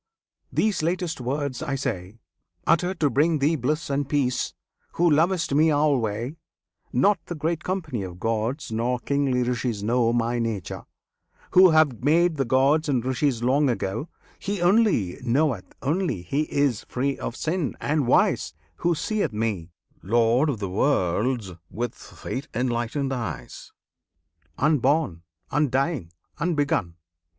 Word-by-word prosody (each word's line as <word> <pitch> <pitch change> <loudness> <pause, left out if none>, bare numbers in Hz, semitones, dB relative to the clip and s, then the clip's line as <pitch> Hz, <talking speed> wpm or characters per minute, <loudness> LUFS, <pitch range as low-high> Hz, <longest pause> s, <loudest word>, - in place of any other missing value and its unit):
these 210 -6 +1
latest 170 -3 -1
words 135 +1 -2
I 145 -3 -2
say 95 -6 -4 0.5
Uttered 175 +2 +2
to 145 - +4
bring 155 +6 +3
thee 150 +3 +2
bliss 150 +4 -1
and 140 0 -1
peace, 130 -4 0 0.4
who 175 - +2
lovest 165 +1 +2
Me 155 +3 +4
alway 135 -3 +1 0.5
Not 195 +12 +3
the 175 - -4
great 160 +2 -2
company 160 - -3
of 90 -2 -7
gods 115 +6 -2
nor 120 +3 0
kingly 135 -1 0
Rishis 120 -3 -2
know 115 +1 +2
My 120 0 0
Nature, 110 -6 -3 0.7
Who 185 0 +8
have 155 -7 +3
made 165 +3 +3
the 135 - +1
gods 140 +5 +3
and 125 -4 +1
Rishis 130 -2 0
long 135 +3 +3
ago; 110 - -2 0.3
He 200 0 -3
only 175 - +2
knoweth 125 -4 0
only 155 - -1
he 145 - -2
is 140 -6 +1
free 135 +2 -2
of 115 - -4
sin, 160 0 -2
and 150 -3 0
wise, 75 - +2 0.2
Who 175 -1 +1
seeth 215 - -1
Me, 105 -6 -2 0.3
Lord 115 - +3
of 135 - -1
the 100 -1 -3
Worlds, 105 +1 0 0.2
with 120 0 -3
faith 135 +4 -7
enlightened 125 +3 -1
eyes, 100 - -6 0.9
Unborn, 145 - +2 0.3
undying, 135 - 0 0.3
unbegun. 145 - 0
135 Hz, 135 wpm, -25 LUFS, 115-155 Hz, 0.9 s, Who